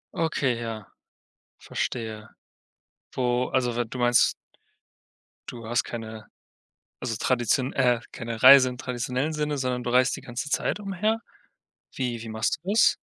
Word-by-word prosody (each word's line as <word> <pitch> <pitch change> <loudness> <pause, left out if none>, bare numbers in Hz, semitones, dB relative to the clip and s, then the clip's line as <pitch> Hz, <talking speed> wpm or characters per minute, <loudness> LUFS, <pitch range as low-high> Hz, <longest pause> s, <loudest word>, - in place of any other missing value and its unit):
Okay, 145 -6 0
ja, 110 -3 -6 0.7
verstehe. 110 -2 -4 0.9
Wo 125 0 0
also 125 -2 0
we 120 0 0
du 115 - -8
meinst 120 0 +4 1.2
du 115 -2 -9
hast 120 +1 +1
keine, 110 -2 -7 0.7
also 115 -3 -3
tradition 125 +1 +1
äh, 125 -2 +2
keine 115 -1 -6
Reise 130 0 +9
im 125 0 -7
traditionellen 125 +4 -2
Sinne, 150 -2 -2
sondern 125 -1 -1
du 120 - -3
reist 125 +1 +3
die - - -9
ganze 120 +4 -5
Zeit 210 - 0
umher. 205 +3 -1 0.7
Wie 120 -3 -3
wie 115 - -7
machst 110 +1 -1
du 195 - -2
das? 225 - +5
125 Hz, 140 wpm, -26 LUFS, 115-130 Hz, 1.2 s, Reise